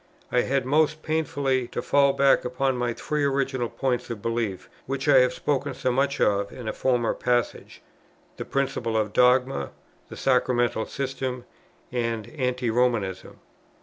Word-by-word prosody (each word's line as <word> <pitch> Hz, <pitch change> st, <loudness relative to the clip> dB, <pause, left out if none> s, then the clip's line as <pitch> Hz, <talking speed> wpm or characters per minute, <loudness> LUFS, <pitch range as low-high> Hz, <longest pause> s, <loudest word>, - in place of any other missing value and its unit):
I 125 Hz, -, +3 dB
had, 135 Hz, 0 st, 0 dB
most 155 Hz, +3 st, +2 dB
painfully, 140 Hz, -5 st, 0 dB
to -, -, -4 dB
fall 140 Hz, -1 st, +3 dB
back 140 Hz, 0 st, +4 dB
upon 130 Hz, +1 st, 0 dB
my 120 Hz, -1 st, -1 dB
three 150 Hz, -1 st, -2 dB
original 135 Hz, -3 st, 0 dB
points 130 Hz, -3 st, -2 dB
of 115 Hz, -3 st, -5 dB
belief, 115 Hz, -4 st, -3 dB, 0.2 s
which 135 Hz, +2 st, -3 dB
I 140 Hz, -2 st, +7 dB
have 125 Hz, 0 st, +4 dB
spoken 140 Hz, +1 st, -2 dB
so 130 Hz, -, 0 dB
much 140 Hz, +2 st, 0 dB
of 100 Hz, 0 st, +1 dB
in 120 Hz, -3 st, -8 dB
a -, -, -2 dB
former 125 Hz, -3 st, +1 dB
passage, 120 Hz, -1 st, -2 dB, 0.5 s
the -, -, -4 dB
principle 135 Hz, -5 st, -1 dB
of 105 Hz, -1 st, -1 dB
dogma, 125 Hz, +2 st, +3 dB, 0.4 s
the -, -, -9 dB
sacramental 120 Hz, -3 st, +1 dB
system, 130 Hz, -2 st, -4 dB, 0.5 s
and 115 Hz, -3 st, -2 dB
anti 125 Hz, -3 st, -1 dB
Romanism. 110 Hz, -6 st, -1 dB
125 Hz, 150 wpm, -25 LUFS, 120-135 Hz, 0.5 s, I